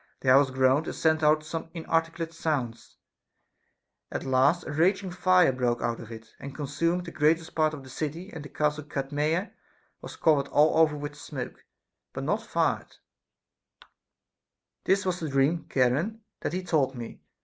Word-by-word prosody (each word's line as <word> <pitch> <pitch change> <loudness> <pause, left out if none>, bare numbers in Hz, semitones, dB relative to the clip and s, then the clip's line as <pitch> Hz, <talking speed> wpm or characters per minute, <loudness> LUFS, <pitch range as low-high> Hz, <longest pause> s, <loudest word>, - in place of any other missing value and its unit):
The 130 - +1
house 135 +1 +6
groaned, 130 +4 +2
and - - -4
sent 160 -1 +2
out 155 0 +4
some 160 +1 -5
inarticulate 165 0 -1
sounds; 140 -9 -3 1.1
at - - -3
last 135 +6 +2
a - - -5
raging 185 +5 +1
fire 180 -3 +4
broke 125 -2 0
out 115 -1 -1
of 115 - -10
it, 110 -1 -11
and 140 0 -8
consumed 165 +5 -1
the 170 - -7
greatest 160 +2 +1
part 155 -1 +1
of 140 - -10
the 130 - -12
city; 165 +8 -5
and 160 - -7
the 145 - -9
castle 150 0 -1
Cadmea 150 +6 -1 0.5
was - - -9
covered 145 -3 +2
all 155 +3 +4
over 155 -2 +4
with 145 0 -5
smoke, 145 -3 -7 0.5
but - - -5
not - - 0
fired. - - -1 1.9
This 190 0 +2
was 180 -1 -1
the 160 - -3
dream, 140 +4 +1
Charon, 145 - +1 0.2
that - - -3
he 185 +1 -2
told 140 -7 +1
me. 120 -2 -8
150 Hz, 165 wpm, -27 LUFS, 135-165 Hz, 1.9 s, house